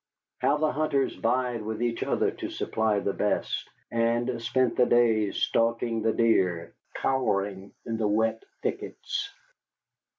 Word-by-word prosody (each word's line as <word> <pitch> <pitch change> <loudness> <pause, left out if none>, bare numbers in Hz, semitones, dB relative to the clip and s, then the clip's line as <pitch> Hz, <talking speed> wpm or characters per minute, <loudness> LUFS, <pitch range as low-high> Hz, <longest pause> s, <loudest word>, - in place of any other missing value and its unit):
How 145 - +2
the 155 0 +1
hunters 140 -1 0
vied 120 0 0
with 110 0 -4
each 120 -1 -1
other - - +1
to - - -6
supply 110 -1 0
the 100 - -1
best, 105 - -1 0.2
and 115 +1 0
spent 120 +1 +1
the 125 - +4
days 110 -4 +3
stalking 115 0 +1
the 110 +1 +2
deer 95 -8 +1 0.2
cowering 100 -6 -1
in 115 -1 -2
the 110 -2 +1
wet 110 - +1 0.2
thickets. 405 -1 -3
115 Hz, 135 wpm, -27 LUFS, 110-125 Hz, 0.2 s, the